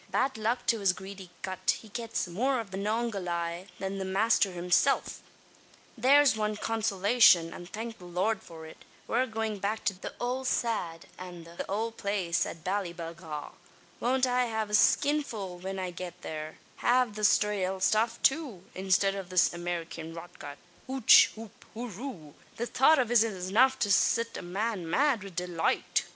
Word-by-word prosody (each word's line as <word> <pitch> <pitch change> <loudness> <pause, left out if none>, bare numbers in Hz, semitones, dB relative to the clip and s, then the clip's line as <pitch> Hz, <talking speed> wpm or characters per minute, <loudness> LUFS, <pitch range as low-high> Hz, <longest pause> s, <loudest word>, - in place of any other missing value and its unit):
Bad 255 +8 0
luck 220 +3 -1
to 230 - +2
his 195 -2 +3
greedy 190 -1 -10
gut! 185 -1 -1
he 220 - -14
gets 230 -3 -3
more 250 +9 0
av 215 -5 -6
the 190 - -5
Manongahayla 190 -5 -2
than 195 0 -4
the - - -2
masther 195 +2 +2
himsilf. 180 +9 +1 0.8
"There's 275 +2 +5
wan 215 -1 -1
consolashun, 205 -5 +3
an 175 - -9
thank 225 +4 -7
the 180 - -12
Lord 190 +4 -1
for 160 -1 -11
it, 160 - -13 0.2
we're 250 +3 +1
goin' 220 -2 -3
back 210 +3 -2
to 195 - +2
the 185 - -8
owld 250 +2 -2
sad, 175 -11 -1
an 180 -2 -8
the 170 +1 -7
owld 225 +3 -2
place 190 -4 0
at 165 - -9
Ballyballagh. 170 -5 -4 0.5
Won't 255 +2 +2
I 250 0 +1
have 220 -2 -3
a - - -7
skinful 215 -6 +2
when 190 +2 -5
I 185 -1 -3
get 175 0 -7
thare 155 0 -6 0.3
av 245 -2 +3
the 215 - -6 0.2
raal 190 -2 -2
stuff 225 +4 +2
too, 270 - +1
instid 195 +1 +2
of 195 -2 -6
this 185 -1 +4
Amerikyan 170 -1 -5
rotgut! 165 -4 -9 0.3
Hooch 260 -3 +6
hoop 220 -1 -12
horoo! 220 - -7 0.2
The 235 - -2
thought 270 +6 +4
av 245 -3 +1
it's 240 -2 +6
enough 220 +5 +2
to 205 - 0
sit 230 +3 +2
a - - -5
man 190 0 -3
mad 270 - +2
wid 195 -3 -10
deloight. 175 -2 0
200 Hz, 165 wpm, -29 LUFS, 180-230 Hz, 0.8 s, Hooch